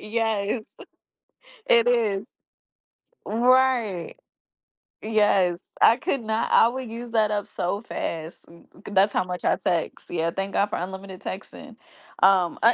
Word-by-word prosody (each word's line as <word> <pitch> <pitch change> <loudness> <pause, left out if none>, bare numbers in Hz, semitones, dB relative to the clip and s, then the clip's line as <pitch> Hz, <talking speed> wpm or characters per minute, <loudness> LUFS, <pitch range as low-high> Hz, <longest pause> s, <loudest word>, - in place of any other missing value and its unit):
Yes, 220 0 -2 0.9
it 235 0 +4
is. 220 -4 +1 1.0
Right. 240 -4 +2 0.9
Yes, 200 -5 +2 0.2
I 230 - +6
could 270 0 -2
not 220 +1 -2
I - - +6
would 255 -1 -6
use 235 +1 -7
that 220 -2 +2
up 205 -1 -1
so 190 +4 -3
fast, 165 -7 -5
'cause 170 +4 -14
that's 195 +2 +4
how - - +1
much 180 0 -6
I - - +3
text. 170 -2 -2
Yeah, 165 -1 -1
thank 195 +2 -4
God 200 - +2
for - - -1
unlimited 190 +1 -7
texting, 220 +6 -8 0.5
um, 185 -3 +4
uh, 235 +2 +7
210 Hz, 135 wpm, -24 LUFS, 190-230 Hz, 1.0 s, uh